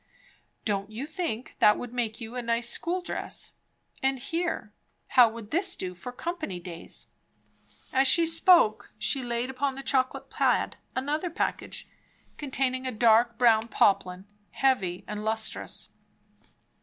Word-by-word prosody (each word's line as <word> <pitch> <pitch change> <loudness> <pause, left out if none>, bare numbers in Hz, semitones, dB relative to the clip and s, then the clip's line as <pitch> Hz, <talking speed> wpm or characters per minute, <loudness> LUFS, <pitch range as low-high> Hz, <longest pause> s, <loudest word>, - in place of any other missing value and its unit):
"Don't 200 -1 -1
you 225 +6 -5
think 310 -7 -4
that 210 - +6
would 245 -1 -7
make 230 -3 -2
you 230 0 -8
a 250 - -2
nice 235 0 0
school 350 +8 0
dress? - - -3 0.5
and 270 0 +1
here 325 -5 -3 0.4
how 245 -3 +7
would 225 -1 -10
this 365 +3 +1
do 180 -1 -5
for 180 +8 -8
company 310 - -4
days?" 170 -1 -7 0.8
As 265 +1 +4
she 335 +4 +4
spoke, 330 - +4
she 275 - 0
laid 240 +1 -2
upon 265 +1 -1
the 270 - -7
chocolate 260 -2 0
plaid - - +1 0.2
another 295 +6 -1
package, 325 - -3 0.5
containing 260 -2 -1
a - - -1
dark 230 0 +4
brown 230 -2 +4
poplin, 185 -3 +2 0.2
heavy 195 -10 0
and 210 0 -5
lustrous. 220 0 -2
245 Hz, 140 wpm, -28 LUFS, 220-275 Hz, 0.8 s, how